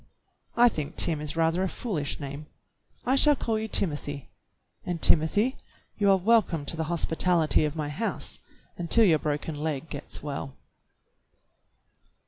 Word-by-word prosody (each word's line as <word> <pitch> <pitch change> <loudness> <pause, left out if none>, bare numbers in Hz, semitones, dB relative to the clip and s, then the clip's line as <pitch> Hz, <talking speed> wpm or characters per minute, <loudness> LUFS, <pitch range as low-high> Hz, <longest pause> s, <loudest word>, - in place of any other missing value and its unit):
"I 240 +1 +7
think 155 -9 -3
Tim 155 -3 +1
is 150 0 -4
rather 165 +2 +1
a 190 - +1
foolish 165 - -3
name. 140 +1 -7 0.6
I 260 - +2
shall 295 +2 +5
call 225 -4 -2
you 220 - -3
Timothy, 145 -8 -2 0.5
and, 175 -2 -3
Timothy, 205 - +3 0.4
you 200 -1 +3
are 195 - +6
welcome 190 -6 +2
to 165 - -1
the 160 0 -2
hospitality 165 -1 +2
of 150 0 -3
my 150 -2 -3
house 160 +10 -3 0.4
until 180 +6 +4
your 160 -5 +4
broken 150 +2 -3
leg 150 -1 -3
gets 145 0 -7
well." 140 -2 -5
160 Hz, 145 wpm, -27 LUFS, 150-200 Hz, 0.6 s, I